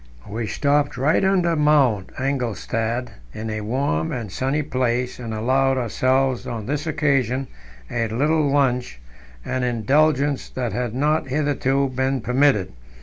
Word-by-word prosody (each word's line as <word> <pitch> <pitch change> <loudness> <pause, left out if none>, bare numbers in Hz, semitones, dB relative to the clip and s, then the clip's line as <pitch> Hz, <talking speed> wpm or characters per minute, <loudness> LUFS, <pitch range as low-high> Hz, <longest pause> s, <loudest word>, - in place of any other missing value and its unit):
We 110 +2 -4
stopped 145 +5 +1
right 150 +8 +2
under 180 -3 +2
Mount 140 -10 +3
Engelstad 120 -2 -2 0.3
in 110 0 -4
a 110 0 -3
warm 105 - -1
and 115 -6 -4
sunny 135 +7 -1
place, 125 -2 -1
and 115 -2 -5
allowed 130 +4 +1
ourselves 130 +2 +1
on 115 -3 -4
this 150 +6 -2
occasion 135 -4 +1 0.4
a 115 - -1
little 145 +6 +1
lunch, 125 - +1 0.5
an 130 0 -2
indulgence 140 +4 +1
that 125 -3 -3
had 120 -2 -2
not 150 +2 +1
hitherto 140 -1 0
been 130 +1 0
permitted. 125 - +2
130 Hz, 135 wpm, -22 LUFS, 120-145 Hz, 0.5 s, Mount